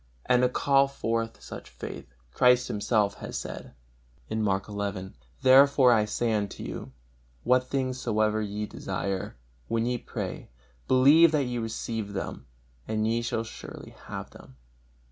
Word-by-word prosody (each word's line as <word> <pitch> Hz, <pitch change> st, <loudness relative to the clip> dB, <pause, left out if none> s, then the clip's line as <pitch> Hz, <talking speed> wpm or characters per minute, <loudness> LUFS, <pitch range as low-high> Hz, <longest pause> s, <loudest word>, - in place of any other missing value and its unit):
And 125 Hz, 0 st, +4 dB
to 125 Hz, -, +4 dB
call 140 Hz, +2 st, +3 dB
forth 115 Hz, -4 st, -2 dB
such -, -, -9 dB
faith, -, -, -8 dB, 0.2 s
Christ 125 Hz, -, +4 dB
Himself 105 Hz, -1 st, 0 dB
has -, -, -5 dB
said, -, -, -7 dB, 0.6 s
Mark 100 Hz, -3 st, 0 dB
xi: 100 Hz, -2 st, -4 dB, 0.3 s
"Therefore 135 Hz, -1 st, +7 dB
I 110 Hz, -2 st, +3 dB
say 115 Hz, +2 st, -1 dB
unto 100 Hz, -2 st, -2 dB
you, -, -, -6 dB, 0.5 s
What 125 Hz, +1 st, +3 dB
things 130 Hz, -1 st, -2 dB
soever 110 Hz, 0 st, +1 dB
ye 105 Hz, 0 st, -3 dB
desire, 95 Hz, -7 st, -4 dB, 0.3 s
when 115 Hz, 0 st, 0 dB
ye 125 Hz, 0 st, -1 dB
pray, -, -, -6 dB, 0.4 s
believe 145 Hz, +6 st, +6 dB
that 150 Hz, -2 st, +3 dB
ye 120 Hz, -1 st, -3 dB
receive 115 Hz, -2 st, -4 dB
them, 95 Hz, -8 st, -5 dB, 0.4 s
and 110 Hz, 0 st, 0 dB
ye 115 Hz, +1 st, +1 dB
shall 115 Hz, -1 st, -2 dB
surely 110 Hz, -, -10 dB, 0.2 s
have -, -, -6 dB
them." 65 Hz, -, -15 dB
115 Hz, 145 wpm, -27 LUFS, 105-125 Hz, 0.6 s, Therefore